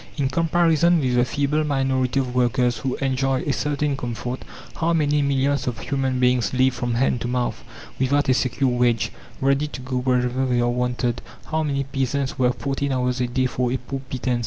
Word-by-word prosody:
In 135 Hz, -3 st, +1 dB
comparison 165 Hz, +2 st, +3 dB
with 130 Hz, -4 st, 0 dB
the 120 Hz, 0 st, +4 dB
feeble 145 Hz, +3 st, 0 dB
minority 135 Hz, -2 st, +1 dB
of 125 Hz, -2 st, -2 dB
workers 125 Hz, -1 st, +1 dB
who 130 Hz, +3 st, -2 dB
enjoy 135 Hz, -1 st, 0 dB
a 145 Hz, -, 0 dB
certain 145 Hz, 0 st, -1 dB
comfort, 125 Hz, 0 st, -4 dB, 0.4 s
how 165 Hz, +1 st, +1 dB
many 150 Hz, -2 st, +2 dB
millions 140 Hz, 0 st, +1 dB
of 120 Hz, -3 st, -2 dB
human 135 Hz, 0 st, -1 dB
beings 125 Hz, -2 st, +2 dB
live 130 Hz, 0 st, +3 dB
from 120 Hz, -1 st, -2 dB
hand 125 Hz, -1 st, +1 dB
to -, -, -2 dB
mouth, 125 Hz, 0 st, -2 dB, 0.4 s
without 140 Hz, +3 st, +2 dB
a 130 Hz, -, +5 dB
secure 130 Hz, +1 st, +1 dB
wage, 120 Hz, -2 st, +1 dB, 0.3 s
ready 140 Hz, +2 st, +2 dB
to 150 Hz, -, -8 dB
go 130 Hz, 0 st, -3 dB
wherever 125 Hz, 0 st, +1 dB
they 125 Hz, -1 st, +1 dB
are 120 Hz, 0 st, +2 dB
wanted; 125 Hz, -1 st, -1 dB, 0.3 s
how 160 Hz, 0 st, +1 dB
many 140 Hz, -3 st, -1 dB
peasants 135 Hz, 0 st, -2 dB
work 125 Hz, -1 st, +2 dB
fourteen 140 Hz, 0 st, -2 dB
hours 125 Hz, -1 st, 0 dB
a 125 Hz, -, +1 dB
day 130 Hz, +2 st, 0 dB
for 125 Hz, -1 st, -1 dB
a 130 Hz, -, +1 dB
poor 135 Hz, +2 st, -6 dB
pittance! 125 Hz, -1 st, -1 dB
130 Hz, 195 wpm, -23 LUFS, 125-140 Hz, 0.4 s, a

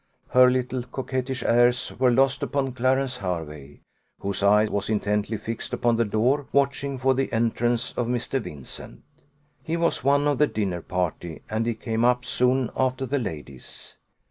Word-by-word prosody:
Her 125 Hz, 0 st, +6 dB
little 125 Hz, 0 st, -1 dB
coquettish 130 Hz, +1 st, -4 dB
airs 120 Hz, +1 st, +3 dB
were 130 Hz, -1 st, +5 dB
lost 135 Hz, +3 st, +3 dB
upon 140 Hz, -2 st, -1 dB
Clarence 130 Hz, +1 st, +1 dB
Hervey, 75 Hz, -, -5 dB, 0.4 s
whose 100 Hz, 0 st, -3 dB
eye 105 Hz, +2 st, +5 dB
was 100 Hz, -1 st, -2 dB
intently 105 Hz, 0 st, 0 dB
fixed 115 Hz, +2 st, -5 dB
upon 120 Hz, -1 st, +2 dB
the 115 Hz, -, +2 dB
door, 125 Hz, +7 st, +1 dB
watching 140 Hz, 0 st, +1 dB
for 130 Hz, +1 st, +2 dB
the 135 Hz, +1 st, -1 dB
entrance 120 Hz, +1 st, 0 dB
of 120 Hz, -, -2 dB
Mr. 125 Hz, +2 st, -1 dB
Vincent. 70 Hz, -, -9 dB, 0.6 s
He 165 Hz, 0 st, -2 dB
was 170 Hz, 0 st, 0 dB
one 140 Hz, +2 st, +3 dB
of 145 Hz, -3 st, +1 dB
the 150 Hz, -, +5 dB
dinner 95 Hz, -8 st, -2 dB
party, 85 Hz, -2 st, -3 dB
and 110 Hz, +1 st, 0 dB
he 120 Hz, -, 0 dB
came 115 Hz, 0 st, -2 dB
up 125 Hz, 0 st, +3 dB
soon 125 Hz, 0 st, +1 dB
after 130 Hz, 0 st, 0 dB
the 140 Hz, +3 st, -1 dB
ladies. 75 Hz, -, -7 dB
125 Hz, 165 wpm, -25 LUFS, 105-130 Hz, 0.6 s, Her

